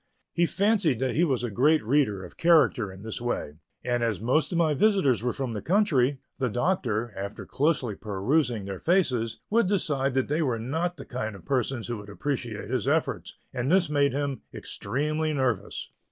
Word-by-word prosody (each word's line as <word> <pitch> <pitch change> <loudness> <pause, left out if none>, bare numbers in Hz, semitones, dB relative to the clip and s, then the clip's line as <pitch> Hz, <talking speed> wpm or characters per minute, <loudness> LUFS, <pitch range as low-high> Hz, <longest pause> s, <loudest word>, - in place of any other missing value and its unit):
He 175 0 +2
fancied 200 - +2
that 130 +2 -1
he 165 - +2
was 130 -7 +1
a 120 - -2
great 145 +6 +3
reader 110 -7 +1
of - - -13
character 155 - +3
in 95 +2 -12
this 110 +1 -5
way, 80 -10 -3 0.2
and 120 -1 0
as 115 -5 0
most 130 +7 +1
of 175 - 0
my 160 -3 +3
visitors 175 - +3
were 125 +1 0
from 130 -1 -3
the 105 - -4
country, 155 -9 +2 0.2
the 130 -2 +1
Doctor, 120 - 0
after 100 +2 -6
closely 140 -6 0
perusing 110 +3 0
their 95 -2 -5
faces, 125 - +1
would 230 -2 +3
decide 140 -9 0
that 130 - +1
they 150 +3 0
were 130 -7 0
not 160 +10 -2
the 135 - -8
kind 110 -4 -4
of 95 - -13
persons 130 -3 -1
who 120 -1 -3
would 105 0 -10
appreciate 120 -2 -4
his - - -1
efforts, - - -1 0.2
and 125 +4 -1
this 180 -4 +4
made 140 -1 +3
him 140 -1 -2
extremely 150 +8 -2
nervous. 130 -7 -2
130 Hz, 190 wpm, -27 LUFS, 115-155 Hz, 0.2 s, this